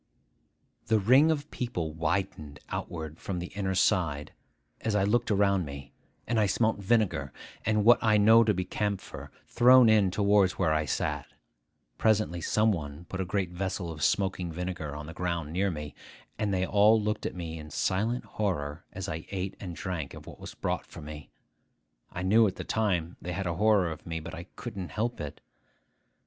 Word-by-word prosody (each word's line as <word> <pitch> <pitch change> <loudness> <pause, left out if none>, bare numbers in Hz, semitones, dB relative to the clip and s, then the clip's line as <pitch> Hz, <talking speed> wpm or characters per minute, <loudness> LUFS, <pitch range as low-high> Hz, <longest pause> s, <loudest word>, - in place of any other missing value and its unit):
The 110 - +4
ring 130 +10 +5
of 150 -2 -1
people 115 -11 -3
widened 80 -3 -2
outward 80 -1 -5
from 95 - -4
the 90 0 -5
inner 95 -2 -2
side 85 -7 +1 0.5
as 110 -2 -1
I 100 - +3
looked 115 +4 +1
around 100 -2 +3
me; 70 -2 -8 0.3
and 115 -1 0
I 105 - +3
smelt 110 +2 +1
vinegar, 100 - +1 0.4
and 105 -1 +2
what 120 +1 +7
I 110 -1 +4
know 110 +3 +7
to 105 - +3
be 90 -2 -1
camphor, 100 +1 -4 0.2
thrown 125 -1 +6
in 105 -3 +5
towards 100 0 +3
where 80 - +1
I 75 0 +1
sat. 65 - -2 0.7
Presently 110 -6 +2
some 110 +6 +2
one 75 -2 -5
put 95 - -3
a - - -2
great 90 -1 -1
vessel 90 -1 -3
of 75 -1 -8
smoking 90 +2 +1
vinegar 80 -3 -4
on 75 0 -6
the 80 - -8
ground 85 -3 -3
near 100 +3 +1
me; 75 -4 -5 0.5
and 105 -2 0
then 95 -1 +1
they - - +2
all 105 +3 +5
looked 105 0 -1
at - - -7
me 80 -2 -5
in 75 0 -9
silent 110 - -1
horror 85 -7 -3
as 95 0 -5
I 80 +1 -5
ate 95 0 -3
and 90 -4 -6
drank 85 -7 -4
of - - -11
what - - -11
was - - -9
brought - - -2
for - - -10
me. 75 -1 -9 0.8
I 90 - -4
knew 110 +4 +5
at 95 - -3
the - - -6
time 90 -6 -1
they 90 - -4
had 95 +3 -3
a 85 - -1
horror 100 -2 +3
of 80 - -9
me, 80 -1 -3
but 80 - -8
I 85 - -7
couldn't 100 -7 -6
help 115 -2 -2
it. 75 -2 -7
95 Hz, 190 wpm, -29 LUFS, 80-105 Hz, 0.8 s, what